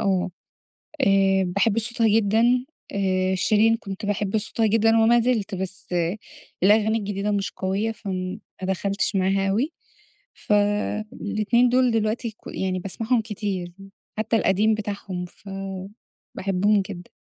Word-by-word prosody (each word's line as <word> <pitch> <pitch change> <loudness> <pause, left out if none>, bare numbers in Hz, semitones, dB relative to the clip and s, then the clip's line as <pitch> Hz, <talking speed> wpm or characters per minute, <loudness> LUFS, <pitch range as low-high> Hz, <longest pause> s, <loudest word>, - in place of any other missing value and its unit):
آه. 190 -2 +1 0.7
آآ 195 -3 +4
باحب 200 +4 +1
صوتها 230 0 +1
جدًا. 220 +1 +3 0.5
آآ 190 -1 +1
شيرين 220 +4 +3
كنت 195 -2 -7
باحب 205 +1 0
صوتها 220 +1 0
جدًا، 225 +1 +3
وما 235 +2 +5
زِلت. 225 -5 0
بس 190 0 -5 0.8
الأغاني 215 +3 +4
الجديدة 205 0 -2
مش 200 -1 -1
قوية، 195 +4 -1
فما 190 -2 -5 0.2
دخلتش 195 +2 -1
معاها 195 +1 +2
أوي. 260 - 0 0.6
فالاتنين 210 +2 +1
دول 255 0 +3
دلوقتي 225 +1 0
ك 215 - -24
يعني 185 -1 -2
باسمعهم 225 +6 -1
كتير. 195 -5 -4 0.5
حتّى 220 +1 +1
القديم 215 +2 +3
بتاعهم 200 -3 -4
ف 195 +3 -16 0.9
باحبهم 195 +2 +2
جدًا. 185 -3 -9
205 Hz, 120 wpm, -24 LUFS, 195-220 Hz, 0.9 s, وما